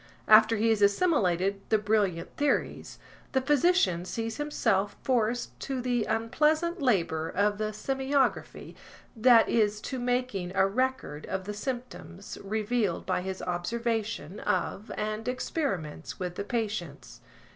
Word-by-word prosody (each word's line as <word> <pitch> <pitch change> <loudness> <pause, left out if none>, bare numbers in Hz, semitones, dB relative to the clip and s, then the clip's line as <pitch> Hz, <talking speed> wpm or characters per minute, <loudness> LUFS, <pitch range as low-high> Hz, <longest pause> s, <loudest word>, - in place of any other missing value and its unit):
After 220 +1 +7
he 225 +2 +2
has 220 -2 +2
assimilated 200 - +2
the 220 - +4
brilliant 205 -5 0
theories, 290 0 -1 0.4
the 265 - +2
physician 290 - +3
sees 225 +4 -4
himself 225 -9 0
forced 240 -1 0
to 270 -2 -3
the 245 -3 0
unpleas 300 +8 +2
ant 340 0 -3
labor 165 - +1
of 205 +3 0
the 215 - 0
semiography, 270 +4 -1 0.4
that 230 0 +6
is 210 -2 +2
to 260 - -4
making 245 -7 -1
a 195 - +4
record 210 - -2
of 190 0 -3
the 210 +2 -5
symptoms 240 -5 -6
revealed 215 -1 -1
by - - 0
his 190 0 -5
observation 210 +1 -2
of 210 - -2
and 215 +1 -3
experiments 250 - -3
with 180 -1 -3
the 200 - -5
patients. 205 -10 -4
220 Hz, 135 wpm, -28 LUFS, 195-250 Hz, 0.4 s, After